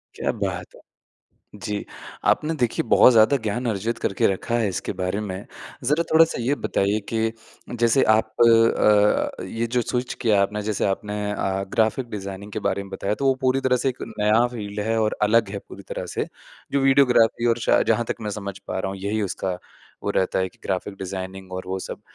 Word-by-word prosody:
क्या - - -1
बात - - -4
है! - - -16 0.7
जी। 105 -1 -4 0.4
आपने 155 +2 +2
देखिए 120 -2 +1
बहुत 125 - +7
ज़्यादा 115 +4 +5
ज्ञान 120 +4 -2
अर्जित 115 +2 -2
करके 95 - +1
रखा 100 +4 -1
है 110 -3 +1
इसके 95 - -3
बारे 90 +3 -1
में। 100 -2 -5 0.4
ज़रा 150 +6 +2
थोड़ा-सा 160 -4 +4
ये 130 +5 +1
बताइए 100 -6 0
कि 110 0 +1 0.5
जैसे 120 +3 +4
आप 110 0 +3
अ, 115 -3 +4
ये 115 +1 -3
जो 120 +1 0
स्विच 125 +2 -2
किया 110 -5 +4
आपने 105 +2 -2
जैसे 105 -1 -1
आपने 105 +1 -2 0.2
अ, 95 -1 -1
ग्राफिक 115 +3 +1
डिज़ाइनिंग 100 0 -7
के - - -2
बारे 100 - -1
में 100 - -12
बताया, 100 +1 -2
तो 135 +6 -2
वो 135 - +4
पूरी 130 0 +2
तरह 130 -1 +2
से - - +3
एक 130 - -5 0.2
नया 105 +3 +4
फ़ील्ड 105 -2 -5
है 115 0 +1
और 110 -1 0
अलग 110 +1 +4
है 100 - -4
पूरी - - -10
तरह - - -4
से। - - 0 0.5
जो 140 - +2
वीडियोग्राफी 125 -4 +4
और 115 0 +2
शायद - - +4
जहाँ 115 +1 +2
तक - - -1
मैं 105 -1 -3
समझ 100 -1 -6
पा 95 - -5
रहा 95 - -2
हूँ, 95 - -7
यही 105 +2 -1
उसका 95 -2 -3 0.5
वो - - 0
रहता 95 - 0
है 95 0 0
कि - - -27
ग्राफिक 95 +1 -3
डिज़ाइनिंग 95 0 -6
और 95 0 -4
वो 95 +1 -3
सब। - - -7
105 Hz, 205 wpm, -23 LUFS, 100-120 Hz, 0.7 s, बहुत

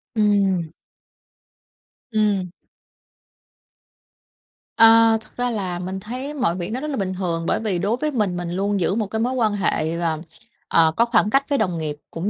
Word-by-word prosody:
Ừm. 200 -5 +2 1.4
Ừm. 205 -4 +1 2.3
À, 225 0 +7
thật - - -19
ra 245 0 0
là 185 -5 -3
mình 185 +2 -4
thấy 255 +8 -6
mọi 250 - 0
việc 175 -1 -4
nó 245 - -2
rất 300 - -5
là 280 - -3
bình 190 -2 -2
thường 170 -3 -2
bởi - - +1
vì 205 -6 -1
đối 210 +6 0
với 305 +2 -1
mình 205 -8 -1
mình 175 -1 -4
luôn 200 +2 -1
giữ 185 +2 +1
một 215 -2 -1
cái 220 +2 -3
mối 245 +3 0
quan 225 -5 +1
hệ, 170 -5 -1
ờ, 160 -2 -1 0.5
ờ, 160 -1 +4
có 235 - +4
khoảng 225 -3 +2
cách 275 +5 +3
với 280 - +2
đồng 185 -7 0
nghiệp, 155 -2 -3 0.2
cũng 170 +5 -3
205 Hz, 180 wpm, -22 LUFS, 180-225 Hz, 2.3 s, À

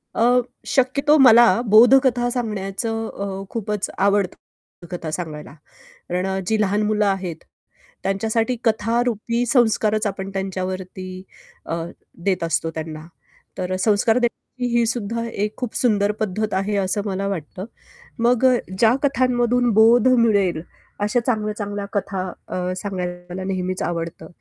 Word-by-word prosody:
अ, 245 +2 +4 0.3
शक्यतो 280 +2 +3
मला 240 -3 +8 0.2
बोधकथा 245 +3 +5
सांगण्याचं 225 -1 -3
अ, 195 -1 -5
खूपच 210 -3 -3
आवडतं 195 -3 -2
कथा 165 -3 -5
सांगायला. 155 -4 -6 0.6
कारण 180 +1 -1
अ, 190 0 -1
जी 220 -1 +1
लहान 205 +1 +1
मुलं 215 -1 +1
आहेत, 190 -4 -1 0.7
त्यांच्यासाठी 225 +5 0
कथा 225 +1 +1
रुपी 235 +1 -1
संस्कारच 220 -3 +2
आपण 195 0 -4
त्यांच्यावरती 185 -1 -5 0.4
अ, 165 - -2 0.5
देत 185 -4 +1
असतो 165 0 -1
त्यांना. 155 0 -6 0.5
तर 185 0 -2
अ, - - 0
संस्कार 220 +3 +3
देण्याची 245 0 -2
ही 235 - +3
सुद्धा 230 0 -2
एक 210 -1 -3
खूप 250 -3 -5
सुंदर 210 -4 +2
पद्धत 215 0 -1
आहे 200 +2 0
असं 195 +1 0
मला 195 0 -2
वाटतं. 185 0 -5 0.5
मग 240 +2 +2
अ, 255 -1 +5 0.2
ज्या 225 +3 +5
कथांमधून 245 -2 +2
बोध 230 +3 +6
मिळेल, 205 -9 +3 0.4
अशा 210 +4 +1
चांगल्या-चांगल्या 210 -3 -2
कथा 195 -2 -2 0.2
अ, 180 0 -2
सांगायला 180 -1 -5
नेहमीच 185 -1 -2
आवडतं. 170 -1 -4
210 Hz, 130 wpm, -21 LUFS, 190-235 Hz, 0.7 s, मला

